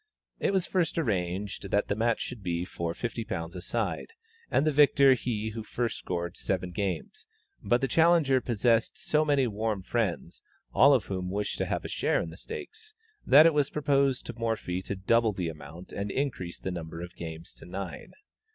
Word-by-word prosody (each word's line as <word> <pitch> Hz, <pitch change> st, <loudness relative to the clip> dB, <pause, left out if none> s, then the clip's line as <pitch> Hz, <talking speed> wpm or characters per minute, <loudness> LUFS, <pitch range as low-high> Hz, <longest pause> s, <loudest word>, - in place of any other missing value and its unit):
It -, -, +1 dB
was 190 Hz, -2 st, +1 dB
at -, -, -16 dB
first 175 Hz, -4 st, +1 dB
arranged 100 Hz, -, -2 dB
that 105 Hz, -, +1 dB
the 100 Hz, -, 0 dB
match 115 Hz, +2 st, +1 dB
should 125 Hz, -4 st, -5 dB
be 85 Hz, -1 st, -2 dB
for 85 Hz, -2 st, -3 dB
£50 95 Hz, -8 st, -4 dB
a 90 Hz, -, -5 dB
side, -, -, -2 dB, 0.4 s
and 145 Hz, -, +2 dB
the 155 Hz, -, +3 dB
victor 140 Hz, -2 st, +6 dB
he 110 Hz, -3 st, -2 dB
who 110 Hz, +1 st, -5 dB
first 115 Hz, +2 st, -2 dB
scored 85 Hz, -1 st, -3 dB
seven 90 Hz, -2 st, -2 dB
games, 95 Hz, -3 st, -4 dB, 0.3 s
but 120 Hz, +5 st, +2 dB
the 135 Hz, -, +1 dB
challenger 160 Hz, -3 st, +4 dB
possessed 115 Hz, -1 st, +1 dB
so 155 Hz, 0 st, +1 dB
many 145 Hz, -3 st, +3 dB
warm 110 Hz, -3 st, -2 dB
friends, 100 Hz, -6 st, -2 dB, 0.3 s
all 140 Hz, +2 st, +7 dB
of 120 Hz, -, 0 dB
whom 90 Hz, -2 st, -3 dB
wished 100 Hz, +2 st, -2 dB
to -, -, 0 dB
have -, -, -2 dB
a -, -, -2 dB
share -, -, +1 dB
in 80 Hz, -, -4 dB
the 80 Hz, -, -11 dB
stakes, 435 Hz, +3 st, -8 dB, 0.3 s
that 150 Hz, +3 st, +9 dB
it 165 Hz, -, +6 dB
was 145 Hz, -2 st, +2 dB
proposed 140 Hz, -3 st, +1 dB
to 120 Hz, -, -5 dB
Morphy 110 Hz, -6 st, -1 dB
to 100 Hz, -, -4 dB
double 110 Hz, +3 st, +2 dB
the 90 Hz, -3 st, -2 dB
amount 80 Hz, +3 st, -10 dB
and 100 Hz, +1 st, -3 dB
increase 105 Hz, -10 st, -2 dB
the 95 Hz, -, -4 dB
number 85 Hz, -1 st, -6 dB
of 90 Hz, +1 st, -9 dB
games 80 Hz, 0 st, -8 dB
to -, -, -13 dB
nine. 90 Hz, -1 st, -6 dB
105 Hz, 195 wpm, -29 LUFS, 90-135 Hz, 0.4 s, that